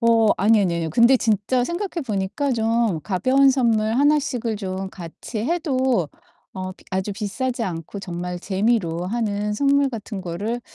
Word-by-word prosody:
어 230 -2 +4
아니, 215 +3 +4
아니, 180 -4 +1
아니요. 165 -1 -2
근데 235 - +5
진짜 235 +2 +1
생각해 345 +1 -3
보니까 215 +7 -1
좀 225 -6 +1
가벼운 255 +8 +3
선물 225 -4 +2
하나씩을 260 -5 +1
좀 190 -1 -4
같이 175 +5 -8
해도 260 - 0 0.4
어 185 -1 -5
비 - - -22
아주 190 +2 -2
비싸지 235 +4 -3
않고 170 +1 -5
정말 180 -1 -5
재미로 190 -3 0
하는 210 -1 -1
선물 280 +4 +3
같은 215 -3 -6
거를 205 +7 -3
220 Hz, 305 characters per minute, -22 LUFS, 190-250 Hz, 0.4 s, 근데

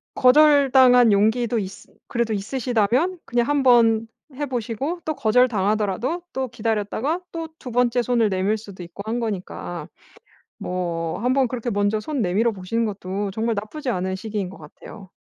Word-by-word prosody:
거절당한 260 -3 +6
용기도 220 +3 +2
있으 190 -1 -8 0.2
그래도 235 -2 -1
있으시다면 245 - 0
그냥 240 0 +1
한번 240 -6 +4 0.3
해 290 +1 -2
보시고 260 +7 -3
또 310 -2 -2
거절당하더라도 220 - +1
또 265 0 -2
기다렸다가 225 - -1
또 330 -1 -5
2 250 - -8
번째 245 0 +2
손을 235 -2 +1
내밀 195 +3 0
수도 200 -4 -10
있고 175 +4 -9
한 230 +2 -2
거니까. 180 -6 -5 0.7
뭐 170 -2 -3
한번 255 +1 +2
그렇게 240 0 -4
먼저 205 0 +1
손 285 0 -3
내밀어 210 +5 +1
보시는 205 +4 -2
것도 195 -1 -4
정말 225 +2 -1
나쁘지 250 +8 -5
않은 190 -4 -1
시기인 205 -2 -4
것 195 - -12
같아요. 185 +5 -13
225 Hz, 335 characters per minute, -22 LUFS, 200-250 Hz, 0.7 s, 거절당한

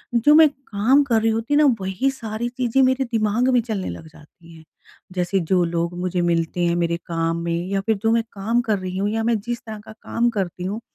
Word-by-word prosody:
जो 290 +6 +5
मैं 320 0 +8
काम 265 0 +1
कर 235 -5 +1
रही 225 0 +2
होती 225 +6 -1
ना 300 +1 +5 0.2
वही 190 +8 0
सारी 230 -3 -5
चीज़ें 250 +1 0
मेरे 260 +1 +2
दिमाग 225 +2 +1
में 250 - +5
चलने 215 -5 -4
लग 160 - -8
जाती 160 +2 -18
हैं। 160 - -15 0.5
जैसे 180 +1 0
जो 180 +1 +1
लोग 170 0 -2
मुझे 180 0 -1
मिलते 170 0 0
हैं 170 0 +1
मेरे 170 -1 0
काम 165 0 -1
में 170 0 -1 0.2
या 195 0 0
फिर 220 +3 0
जो 225 - +3
मैं 230 0 +2
काम 220 +5 0
कर 220 -3 0
रही 185 0 -5
हूँ 200 +2 0
या 225 +1 -1
मैं 230 0 +2
जिस 240 +2 -4
तरह 220 -1 -7
का - - -11
काम 230 +2 -1
करती 190 -5 -4
हूँ 205 +4 -3
215 Hz, 230 wpm, -22 LUFS, 175-235 Hz, 0.5 s, मैं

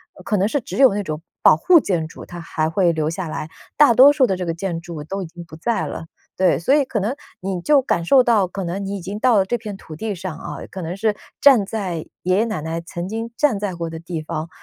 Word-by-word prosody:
呃 - - -14
可 210 - 0
能 195 - +2
是 285 +6 0
只 - - -7
有 265 -5 +6
那 205 - -1
种 155 -3 -5 0.2
保 - - +8
护 340 - +5
建 175 - -1
筑， - - -11
它 175 -1 -9
还 155 -2 -2
会 175 +1 +2
留 155 -2 -1
下 185 0 -4
来， 155 0 -5 0.3
大 285 -5 +7
多 270 +5 +8
数 290 -3 +3
的 195 - 0
这 180 - -4
个 165 - 0
建 170 -2 -3
筑 170 -3 -7
都 195 +6 -5
已 - - -4
经 170 +1 -10
不 160 -1 -12
在 225 +8 -1
了。 - - -6 0.3
对， 185 -7 +3
所 260 - +3
以 295 - +4
可 245 -5 -2
能 220 +7 -1 0.2
你 190 -3 -3
就 285 +6 +4
感 170 -9 0
受 260 +10 +6
到 230 -5 +3
可 185 +1 -5
能 190 +4 -3
你 200 +1 -3
已 - - -7
经 195 +4 -6
到 245 -2 +4
了 190 - +3
这 240 +5 -1
片 210 -4 -7
土 160 - -11
地 215 +6 -3
上 175 -3 -6
啊， - - -7
可 190 - -7
能 170 +3 -5
是 215 0 +1 0.2
站 260 -8 +6
在 195 -4 -3 0.3
爷 185 +1 +2
爷 220 - +3
奶 220 -6 -3
奶 165 +1 -4
曾 175 +1 -6
经 225 +3 -4
站 290 -8 +2
在 200 -2 -3
过 170 -1 -4
的 160 0 -7
地 165 -1 -5
方， 155 +1 -5
190 Hz, 295 characters per minute, -21 LUFS, 170-225 Hz, 0.3 s, 保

